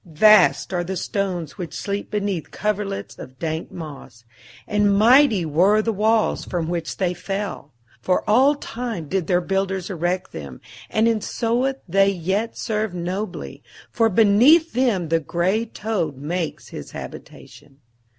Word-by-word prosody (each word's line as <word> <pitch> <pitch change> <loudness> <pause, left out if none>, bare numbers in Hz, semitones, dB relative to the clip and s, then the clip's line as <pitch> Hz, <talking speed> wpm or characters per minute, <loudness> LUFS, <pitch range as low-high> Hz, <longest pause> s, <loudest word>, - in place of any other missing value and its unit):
Vast 190 +3 +4
are 175 -1 0
the 190 +2 -4
stones 180 -6 -3
which 175 -3 -6
sleep 200 0 -4
beneath 200 -5 -2
coverlets 205 -1 -3
of 130 +1 -10
dank 160 +1 -4
moss, 140 -7 -10 0.4
and 205 -1 +2
mighty 230 - +5
were 180 +8 +3
the 225 - 0
walls 215 +2 +1
from 170 -3 -3
which 170 -1 -3
they 180 -2 0
fell. 185 -4 -5 0.3
For 180 +8 0
all 265 +7 +5
time 230 - -5
did 185 0 -1
their 180 -1 +2
builders 195 +1 -2
erect 180 +1 -2
them, 70 -5 -8 0.3
and 220 +1 +2
in 225 -2 +1
sooth 245 +5 0
they 195 +3 +4
yet 195 +5 -2
serve 215 -4 -2
nobly, 185 +5 -5 0.3
for 225 -1 +2
beneath 230 - +5
them 225 -10 +1
the 165 0 +2
grey 180 +8 0
toad 210 - -3
makes 160 +4 -4
his - - -8
habitation. 145 -2 -11
195 Hz, 145 wpm, -22 LUFS, 170-215 Hz, 0.4 s, mighty